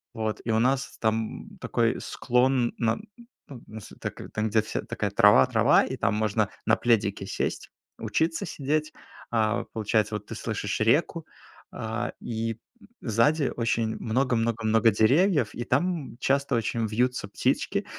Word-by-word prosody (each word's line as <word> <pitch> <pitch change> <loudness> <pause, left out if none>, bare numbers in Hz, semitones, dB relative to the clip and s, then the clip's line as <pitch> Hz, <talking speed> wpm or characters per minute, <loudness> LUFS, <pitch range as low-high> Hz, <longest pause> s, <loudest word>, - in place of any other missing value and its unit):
Вот. 110 -1 -3
И 115 - 0
у 110 - +2
нас 130 +3 0
там 110 0 -1
такой - - 0
склон, 125 0 +1
нас 115 -1 +1 1.0
так - - -5
там, 110 +1 0
где 110 +1 +3
вся 110 - -4
такая 105 -2 -3
трава-трава, 100 -9 +5
и - - -5
там 105 - +1
можно 105 -1 +1 0.2
на - - +4
пледике 100 -5 +1
сесть, - - -3 0.3
учиться 165 +1 -1
сидеть. 155 0 -2 0.4
А, 110 -2 +1
получается, 110 -1 0
вот 105 -1 -5
ты - - -7
слышишь 105 -2 -3
реку, 155 +7 +1 0.4
а, 115 +2 -4
и 115 -1 -3 0.4
сзади 130 +6 +2
очень 115 -1 0
много-много-много 115 -2 +2
деревьев, 135 - +3
и 120 - -3
там 150 -1 -1
часто 140 0 +1
очень 115 0 -1
вьются 125 +4 0
птички, - - -1
115 Hz, 135 wpm, -26 LUFS, 110-130 Hz, 1.0 s, трава-трава